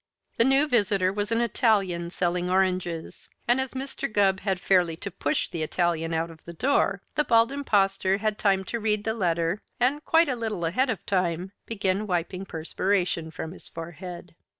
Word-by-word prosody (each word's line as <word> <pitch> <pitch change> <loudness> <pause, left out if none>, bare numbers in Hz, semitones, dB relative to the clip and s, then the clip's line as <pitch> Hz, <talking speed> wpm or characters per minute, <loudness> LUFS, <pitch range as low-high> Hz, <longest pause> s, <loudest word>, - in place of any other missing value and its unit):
The - - +5
new 270 +4 +4
visitor 200 -7 +2
was 205 +1 -2
an 230 +1 +2
Italian 200 -7 +1
selling 180 0 -1
oranges, 185 -3 -1 0.2
and 245 +2 +3
as 265 - -4
Mr. 265 -3 -4
Gubb 195 -2 +3
had 190 -2 -1
fairly 180 -3 +3
to 200 +4 -6
push 145 -3 -1
the 165 - -5
Italian 165 0 0
out 165 +1 -1
of 160 - -16
the 170 - -8
door, 200 - +1
the 300 - +2
Bald 230 -2 +4
Impostor 195 -8 +1
had 215 0 -1
time 195 -2 +2
to 235 +5 -4
read 210 -1 0
the 220 - 0
letter 170 -2 0 0.2
and, 275 +5 +1
quite 330 0 +4
a 260 - 0
little 220 -7 -3
ahead 255 +11 +1
of 220 -7 -3
time, 180 -1 0 0.2
began 200 -1 -1
wiping 180 +1 -2
perspiration 175 0 -1
from 160 0 -6
his 185 - -11
forehead. 175 +2 -8
195 Hz, 180 wpm, -26 LUFS, 175-225 Hz, 0.2 s, The